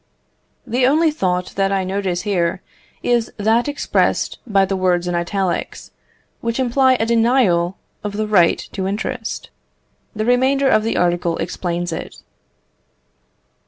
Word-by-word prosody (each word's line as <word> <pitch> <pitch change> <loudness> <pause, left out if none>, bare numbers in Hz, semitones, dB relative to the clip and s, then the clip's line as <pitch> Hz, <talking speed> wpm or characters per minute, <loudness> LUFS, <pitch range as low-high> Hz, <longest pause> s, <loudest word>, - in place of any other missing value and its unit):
The 250 +2 +2
only 315 +3 +3
thought 180 - -1
that 195 0 +2
I 195 -1 +1
notice 185 -2 -2
here, 180 -4 -1 0.4
is 240 -1 +1
that 225 +4 +2
expressed 290 -1 0
by 195 -3 +3
the 195 +1 -2
words 180 -2 +1
in 175 - -1
italics, 175 +1 -2 0.5
which 230 +2 -2
imply 260 +1 +3
a 225 - 0
denial 225 -7 +2 0.3
of 210 -1 -4
the 215 +1 -1
right 190 -6 +4
to 190 -1 -3
interest. 205 +2 -4 0.6
The 215 0 -2
remainder 260 +3 +3
of 215 - +4
the 225 +1 -1
article 175 -1 +1
explains 175 -1 -3
it. - - -6
200 Hz, 135 wpm, -19 LUFS, 180-235 Hz, 0.6 s, right